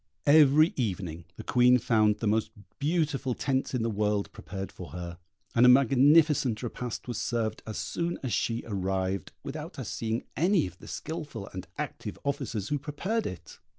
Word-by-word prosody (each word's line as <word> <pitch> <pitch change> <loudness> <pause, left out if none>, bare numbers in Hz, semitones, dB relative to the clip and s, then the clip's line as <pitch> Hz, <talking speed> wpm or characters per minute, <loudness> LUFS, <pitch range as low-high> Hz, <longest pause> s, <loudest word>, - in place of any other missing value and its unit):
Every 150 +2 +6
evening 90 - -3
the - - -8
Queen 125 0 +5
found 110 -3 +3
the 115 - 0
most 110 +1 +1 0.3
beautiful 145 -4 0
tents 135 -1 -1
in 120 - 0
the 115 - 0
world 105 -1 0
prepared 95 +3 -7
for - - -9
her, 85 0 -6 0.3
and 120 - +4
a 125 - +9
magnificent 135 -1 +5
repast 120 0 -5
was 120 - -3
served 110 -2 -1
as 110 - -4
soon 170 0 -2
as 130 - -2
she 115 0 0
arrived, 95 -3 -2
without - - -6
her - - -5
seeing 115 +1 -2
any 180 +3 +3
of 90 0 -9
the - - -12
skilful 145 -10 -6
and 95 -1 -6
active - - -5
officers 115 -7 -2
who 145 - 0
prepared 185 +11 -2
it. 90 - -9
120 Hz, 170 wpm, -29 LUFS, 105-145 Hz, 0.3 s, a